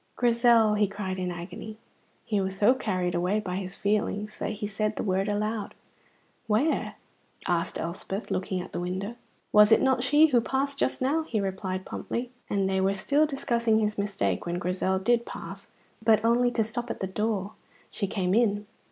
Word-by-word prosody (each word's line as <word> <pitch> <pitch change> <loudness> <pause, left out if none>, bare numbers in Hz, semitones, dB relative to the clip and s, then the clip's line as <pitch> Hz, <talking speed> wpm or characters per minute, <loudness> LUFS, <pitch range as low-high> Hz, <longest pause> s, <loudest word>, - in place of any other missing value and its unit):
"Grizel!" 235 -2 +4
he 210 -1 +3
cried 190 -1 -4
in 180 -1 -1
agony. 180 +5 -7 0.5
He 210 -3 0
was 190 0 -3
so 210 +5 +5
carried 185 -8 -1
away 180 +4 +1
by 185 -3 -3
his 190 0 -5
feelings 210 0 -1
that - - -2
he 210 0 -4
said 215 +1 -1
the - - -3
word 195 0 0
aloud. 210 +1 -2 0.7
"Where?" 225 +9 +1 0.5
asked 170 -1 0
Elspeth, 190 +4 -5
looking 185 0 -1
at 180 - -9
the - - -3
window. 185 +5 -3 0.4
"Was 210 +1 +7
it - - +7
not 260 -2 +2
she 295 +4 +6
who 245 -4 +4
passed 275 +3 -1
just 260 - 0
now?" 295 +5 +2
he 250 -9 -2
replied 190 -1 -3
promptly; 245 +1 -4 0.2
and 195 -2 +1
they 190 0 +1
were 195 +1 +2
still 285 +10 +2
discussing 235 -5 +1
his 215 -1 0
mistake 175 - -1
when 170 0 -1
Grizel 185 +1 0
did 235 +5 +2
pass, - - -8 0.4
but 220 0 +4
only 240 +2 +4
to 230 -2 +1
stop 235 +3 -4
at - - -4
the - - -1
door. 205 +1 -2 0.4
She 200 - -2
came 185 -2 -1
in. 210 -2 +2
210 Hz, 185 wpm, -27 LUFS, 190-235 Hz, 0.7 s, Was